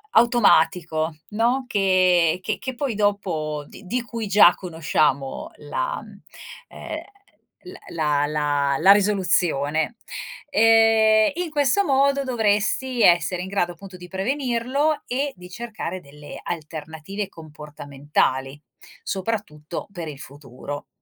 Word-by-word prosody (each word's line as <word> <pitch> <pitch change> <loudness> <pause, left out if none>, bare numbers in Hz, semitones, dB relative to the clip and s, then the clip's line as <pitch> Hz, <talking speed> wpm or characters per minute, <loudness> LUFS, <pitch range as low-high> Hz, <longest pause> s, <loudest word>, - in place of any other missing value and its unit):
automatico, 165 -9 +3
no, 235 +5 +1
che 185 -6 +3
che - - -2
che 260 0 -5
poi 255 -1 -2
dopo 180 -8 -1
d - - -13
di 240 +6 -2
cui 230 -2 -5
già 195 -3 +7
conosciamo 155 - -1
la, - - -3 0.7
ehm, - - -7 0.6
l 365 - -10 0.2
la 150 -3 +1
la 145 -2 0
la 190 +5 +7
risoluzione. 180 - +1 0.5
Ehm, 225 -1 +5
in 355 -1 -2
questo 295 +6 +2
modo 275 0 +2
dovresti 235 +1 0
essere 175 +1 +4
in 185 - -6
grado, 185 -3 0
appunto, 185 +2 -12
di 180 0 -11
prevenirlo 260 - -1
e 275 +3 -1
di 180 0 -12
cercare 220 -4 -6
delle 145 -1 -11
alternative 160 +4 -6
comportamentali, 145 -3 -3 0.4
soprattutto 185 -6 -4
per 170 -4 -6
il 145 -2 -8
futuro. 145 0 -9
185 Hz, 115 wpm, -23 LUFS, 155-230 Hz, 0.7 s, già